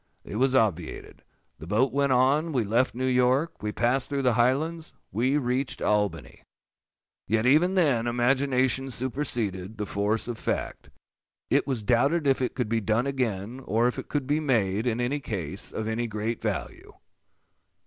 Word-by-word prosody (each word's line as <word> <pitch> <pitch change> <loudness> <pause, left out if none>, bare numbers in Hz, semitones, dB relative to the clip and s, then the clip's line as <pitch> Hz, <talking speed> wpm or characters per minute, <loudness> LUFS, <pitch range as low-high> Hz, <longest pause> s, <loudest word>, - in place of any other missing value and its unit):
It 105 - -6
was 130 +2 +2
obviated. 95 -9 -1 0.4
The 80 - -9
boat 115 +8 +1
went 140 -1 +2
on; 140 +6 +3
we 125 -4 +1
left 115 +6 +1
New 130 +1 -2
York; 130 +5 +1
we 105 0 -2
passed 125 +4 0
through 140 -1 -1
the 125 -2 +3
Highlands; 150 +8 0 0.2
we 130 +7 +1
reached 130 0 -1
Albany!—Yet 105 +1 -4
even 160 +8 +4
then, 135 -10 +2
imagination 130 +1 +1
superseded 115 -6 -3
the 105 - -3
force 105 +3 -1
of 120 -3 -5
fact. - - -3 0.6
_It - - +2
was 130 -6 -2
doubted 140 +8 +2
if 135 -1 +2
it 125 - -1
could 125 -4 -1
be 115 +1 0
done 110 +4 +1
again, 120 -4 -2
or 115 +1 +2
if 125 - -2
it - - -8
could 145 -3 -1
be 145 +3 +1
made, 115 -7 +1
in 120 0 0
any 125 +4 0
case, 95 - -4
of 110 - -4
any 115 +2 -1
great 110 +1 -3
value. - - -4
125 Hz, 165 wpm, -26 LUFS, 110-135 Hz, 0.6 s, even